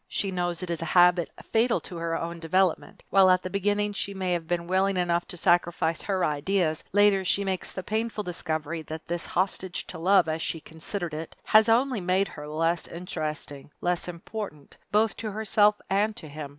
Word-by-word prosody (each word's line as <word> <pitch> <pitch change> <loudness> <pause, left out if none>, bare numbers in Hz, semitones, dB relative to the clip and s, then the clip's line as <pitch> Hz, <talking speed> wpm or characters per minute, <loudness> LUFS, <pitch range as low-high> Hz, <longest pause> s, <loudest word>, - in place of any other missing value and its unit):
She 195 - -1
knows 175 -1 -2
it 175 - -3
is 165 - -3
a - - -2
habit 175 -1 +5
fatal 230 +1 +2
to 175 - -8
her 165 0 -2
own 170 0 -5
development. 180 +1 0
While 195 -1 +6
at 185 0 +4
the 185 - -5
beginning 205 +1 0
she 200 0 -3
may 185 -1 -1
have 165 -2 -3
been 175 0 -1
willing 190 +2 +1
enough 175 -1 +1
to 180 - -7
sacrifice 175 -2 +2
her 190 -3 0
ideas, 155 +2 0
later 205 -1 +4
she 200 +2 +1
makes 190 -2 0
the 185 - -6
painful 220 +1 -2
discovery 160 -3 -3
that 160 +1 -8
this 175 0 -2
hostage 185 0 -1
to 165 - -8
love, 185 +1 +4
as 160 0 -2
she 165 - -2
considered 160 +2 -5
it, 155 +1 -6
has 220 +1 +5
only 245 -1 +2
made 185 +2 +1
her 150 0 -9
less 165 +3 0
interesting, 155 -5 -5
less 175 0 -1
important, 175 -3 -7 0.2
both 215 +1 +3
to 220 - -4
herself 210 0 +3
and 210 +2 +1
to 165 - -7
him. 145 0 -7
180 Hz, 195 wpm, -27 LUFS, 165-200 Hz, 0.2 s, While